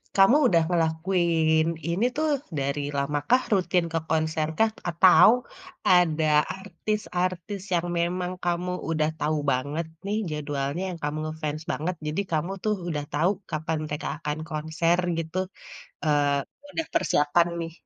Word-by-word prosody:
kamu 195 +6 +6
udah 170 -7 +4
ngelakuin 165 -1 +2
ini 180 +8 +1
tuh 310 +1 +1 0.3
dari 140 +1 -1 0.2
lama 145 +1 0
kah, 255 +2 +5
rutin 180 -2 +2
ke 165 - +2
konser 155 -1 +1
kah? 220 0 +4 0.2
Atau 180 +4 +7 0.6
ada 165 -3 +4 0.3
artis-artis 190 -1 -3
yang 175 0 +1
memang 180 +1 -1
kamu 175 +1 -1 0.2
udah 155 -1 +1
tahu 155 +1 0
banget 145 +6 -1 0.2
nih 210 +2 -1
jadwalnya 145 +2 -2
yang 175 -2 -6
kamu 150 +1 -2
nge-fans 155 0 -4
banget, 175 +4 -2
jadi 155 +6 0
kamu 160 +4 0
tuh 215 -1 +1
udah 150 -4 -2
tahu 160 +5 +2 0.2
kapan 155 +1 -1
mereka 150 0 -4 0.2
akan 150 +1 -2
konser 160 +3 0 0.2
gitu, 165 +2 -5 0.7
eee, 145 -2 +2 0.3
udah 325 - -1
persiapan 150 +4 +3
nih. 165 0 -5
165 Hz, 140 wpm, -26 LUFS, 155-180 Hz, 0.7 s, Atau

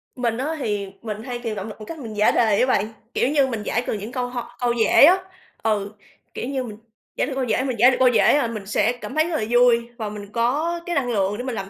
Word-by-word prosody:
mình 235 -3 -1
á 295 +6 -2
thì 205 -6 -2
mình 215 -1 -6
hay 245 -1 -5
tìm 230 -3 -4
động 200 0 -5
lực 215 - -9
bằng 215 - -8
cách 320 +7 -8
mình 230 -5 -7
giải 210 - +4
đề 220 -4 +2
á - - +5
bạn, 210 -5 +2 0.3
kiểu - - +1
như, 280 -2 +3
mình 225 -5 -4
giải 235 +3 -1
cần - - -1
những 210 +4 -7
câu 250 -1 -2
ho 240 -1 -7
câu 245 -1 +1
dễ 235 +4 +6
á, 360 +5 +6 0.5
ừ, 205 -2 0 0.4
kiểu 245 - -4
như, 270 -2 -2
mình 215 -4 -8 0.4
giải - - 0
được 280 - -4
câu 265 - -1
dễ 250 +1 0
mình 255 -3 -2
giải 245 +3 +7
được - - -1
câu 260 - +5
dễ, 245 - +4
à, 280 - +1
mình 215 -3 -6
sẽ 210 +3 +1
cảm - - -7
thấy 315 +2 +2
rất 335 - -2
là - - -1
vui 240 -1 +4
và 220 -3 -4
mình 205 -1 -9
có 290 +10 0
cái 350 - -2
năng 260 -5 0
lượng 200 -2 0
để 245 - -5
mình 255 -2 -4
làm 195 -2 -5
240 Hz, 285 wpm, -22 LUFS, 215-260 Hz, 0.5 s, giải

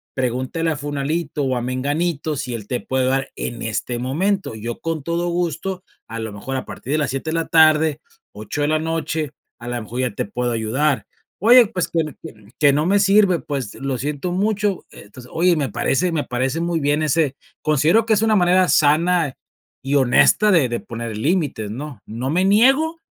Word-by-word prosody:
pregúntale 130 +6 -1
a - - -1
Fulanito 145 +1 -2
o 130 -1 0
a 120 - -2
Menganito 145 +5 -1
si 125 - -4
él 110 -3 -6
te 125 +1 -2
puede 130 -1 -1
dar 135 +1 0
en 120 -1 -5
este 115 +2 -3
momento. 180 - -1
Yo 115 +2 -6
con 165 -3 -3
todo 170 +2 -1
gusto, 175 +2 -2 0.3
a 115 +1 -5
lo 110 -2 -5
mejor 130 +6 -5
a 130 - -5
partir 130 - -8
de - - +2
las 145 - -1
7 135 +4 -4
de - - -2
la 165 0 -1
tarde, 155 -1 +4 0.3
8 110 +8 -5
de 145 - +2
la 155 0 +2
noche, 160 -2 -2 0.3
a 120 - -9
lo 120 -1 -3
mejor 120 +4 -4
ya 125 -3 0
te - - -3
puedo 120 +4 -2
ayudar. 125 +6 0 0.4
"Oye, 240 +3 +8
pues 185 -5 -2
que 165 - 0 0.2
que 105 -2 -12
que 145 -2 +5
no 150 +2 +1
me 200 +3 +3
sirve", 200 -3 +4
pues, 135 -6 -4
lo 135 -1 -3
siento 145 +6 -3
mucho. 205 0 0
Entonces, 120 +5 -14
oye, 175 +1 +3
me 145 -4 -1
parece 170 - 0
me 150 -4 -1
parece 130 +5 -1
muy 170 -1 0
bien 145 +2 +1
ese 150 -2 +1 0.3
considero 155 +9 +3
que 225 - -2
es 210 - +2
una 220 -1 +3
manera 185 -1 +4
sana 155 0 +3 0.5
y 135 +2 -1
honesta 140 +10 +4
de 165 -8 +4
de 120 - -2
poner 115 -2 -6
límites, 140 - -1
¿no? 140 +4 -7
No 120 +4 -4
me 180 +5 +2
niego 270 +11 +3
150 Hz, 200 wpm, -21 LUFS, 125-175 Hz, 0.5 s, Oye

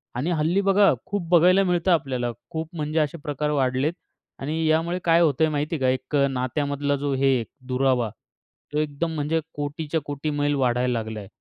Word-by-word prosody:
आणि 140 +8 -1
हल्ली 165 +4 +1
बघा 195 -2 +4
खूप 200 -4 -3
बघायला 180 +3 +5
मिळतं 180 0 +1
आपल्याला, 130 -7 0 0.2
खूप 160 0 -4
म्हणजे 155 0 -1
असे 155 +2 0
प्रकार 150 0 -2
वाढलेत 135 +2 +1 0.5
आणि 155 +4 -2
यामुळे 165 +3 +1
काय 170 0 +4
होतंय 155 0 +3
माहिती 150 +2 -1
आहे - - -4
का, 130 - +3
एक 130 +3 -2
अ, - - +1
नात्यामधला 140 +2 -1
जो 140 0 -2
हे 135 0 +3
आहे, 120 - 0 0.2
दुरावा. 125 -3 +1 0.6
तो - - -1
एकदम 155 +2 -2
म्हणजे 155 +2 0 0.2
कोटीच्या-कोटी 145 0 -3
मैल 145 0 0
वाढायला 125 -2 +1
लागलाय. 110 -3 -4
145 Hz, 175 wpm, -24 LUFS, 135-165 Hz, 0.6 s, बघायला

